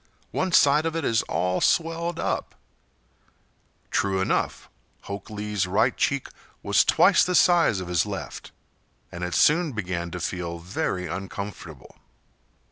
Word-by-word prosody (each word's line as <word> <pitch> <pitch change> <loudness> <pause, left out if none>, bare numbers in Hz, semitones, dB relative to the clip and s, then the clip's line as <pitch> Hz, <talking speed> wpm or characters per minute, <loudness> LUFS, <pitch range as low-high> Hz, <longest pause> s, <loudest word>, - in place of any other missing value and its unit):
One 185 0 -1
side 150 0 +4
of 165 - -3
it 165 -3 -2
is 115 -1 +2
all 90 0 0
swelled 165 +1 +1
up." - - -2 1.4
True 95 -1 +1
enough, 95 - -1 0.3
Hok 100 0 -7
Lee's 105 -2 -2
right 110 +7 +2
cheek 140 -2 0 0.4
was - - +4
twice - - +5
the 180 - 0
size 170 - +4
of 90 - -6
his 90 -1 +2
left, 100 -2 -7 0.6
and 85 - -6
it 90 0 -2
soon 155 -1 +3
began 90 -5 -3
to 90 - -6
feel 85 0 -4
very 90 +1 -3
uncomfortable. 95 -7 -7
100 Hz, 135 wpm, -25 LUFS, 90-150 Hz, 1.4 s, twice